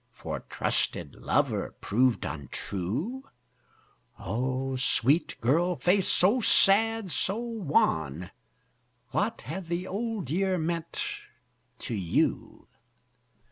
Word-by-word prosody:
For - - -5
trusted - - -1
lover - - 0
proved 125 +3 +2
untrue? 100 - -4 0.9
O 130 +6 -2
sweet 135 +4 +1
girl 170 +9 +2
face, 180 +7 +2
so 205 +8 +4
sad, 220 0 +4
so 195 +5 -1
wan 105 - 0 0.8
What 220 +3 -1
hath 190 -3 -6
the 170 +2 -2
Old 205 - -3
Year 190 +2 +1
meant 170 - -2 0.7
to 120 - -6
you? 95 -6 -1
170 Hz, 95 wpm, -28 LUFS, 125-200 Hz, 0.9 s, so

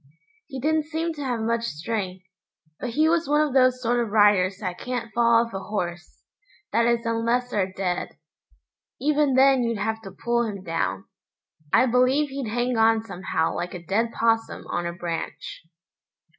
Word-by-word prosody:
He 270 -3 -6
didn't 310 +3 +1
seem 325 +1 -2
to 295 -2 -6
have 245 -4 -2
much 230 +1 0
strength, 185 0 -4 0.5
but 250 - -3
he 305 +7 +2
was 330 -3 +1
one 295 +1 +4
of 275 - -6
those 255 -1 +4
sort 240 +1 +1
of 235 -2 -1
riders 205 -3 +4
that 185 -4 -5
can't 240 -3 -4
fall 235 0 +4
off 230 - -12
a 195 - -3
horse, 175 -4 -5 0.5
that 230 +2 +3
is 235 0 +1
unless 235 +2 0
they're 190 -2 0
dead. 185 -2 -3 0.8
Even 295 -2 +2
then 265 0 +5
you'd 230 -2 -1
have 220 +2 -2
to 195 - -9
pull 235 +5 -1
him 200 -4 -5
down. 165 -2 -2 0.7
I - - +5
believe 255 +4 +2
he'd 270 -4 -4
hang 240 +2 0
on 225 0 +4
somehow 180 -6 -2
like 175 +1 -4
a 175 -1 -9
dead 225 +6 0
'possum 225 -1 0
on 175 0 -1
a - - -3
branch. 170 -1 -6
230 Hz, 175 wpm, -24 LUFS, 195-255 Hz, 0.8 s, then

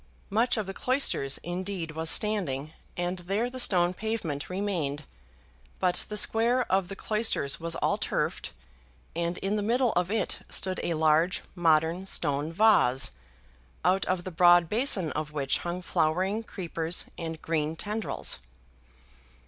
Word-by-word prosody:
Much 230 +4 +2
of 215 - -1
the 195 - -6
cloisters 250 - +1
indeed 180 -1 -4
was 160 +1 -4
standing, 155 -10 -1 0.2
and 175 +1 -2
there 200 +7 -1
the 255 - -5
stone 180 -6 +4
pavement 190 -9 -3
remained; 180 -7 -2 0.8
but 180 -1 +1
the 210 - -2
square 235 +4 +2
of 190 -1 +2
the 195 - -6
cloisters 215 -11 -1
was 170 0 -3
all - - 0
turfed, - - -2 0.6
and 170 +1 -1
in 200 +2 0
the - - 0
middle 240 +3 +2
of 180 0 0
it 220 +2 -1
stood 185 -1 0
a 170 - -1
large 160 +3 +2
modern 165 0 +2
stone 145 -3 0
vase, 165 - +4 0.7
out 185 +1 +3
of 185 -1 -1
the 185 - -6
broad 175 0 +6
basin 210 - +2
of 150 0 -4
which 140 -2 0
hung 175 +1 -4
flowering 185 +7 0
creepers 170 -5 -2
and 160 -1 -5
green 160 -1 -1
tendrils. 210 - -1
180 Hz, 145 wpm, -28 LUFS, 160-205 Hz, 0.8 s, broad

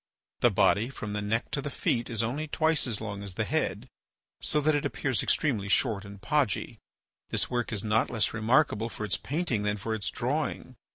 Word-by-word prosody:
The - - +5
body 110 +5 +3
from 105 -6 -6
the 105 - -1
neck 110 +3 -1
to 140 - -1
the 145 - -4
feet 120 -3 -1
is 115 -1 0
only 140 +7 -2
twice 160 -1 +2
as 110 -4 -2
long 100 -2 -5
as 100 -3 -6
the - - 0
head, - - -1 0.5
so 150 - +2
that 155 +1 +3
it 145 - +1
appears 130 -7 0
extremely 110 -10 +1
short 105 -2 +2
and 100 0 -10
podgy. 130 +2 0 0.5
This - - 0
work 120 -1 -1
is 105 -3 -1
not 110 0 +2
less 115 -3 0
remarkable 115 0 +2
for 105 - -5
its 100 - 0
painting 145 -8 -1
than 105 0 0
for 110 +3 -3
its 110 -2 -1
drawing. - - -2
115 Hz, 205 wpm, -29 LUFS, 105-135 Hz, 0.5 s, The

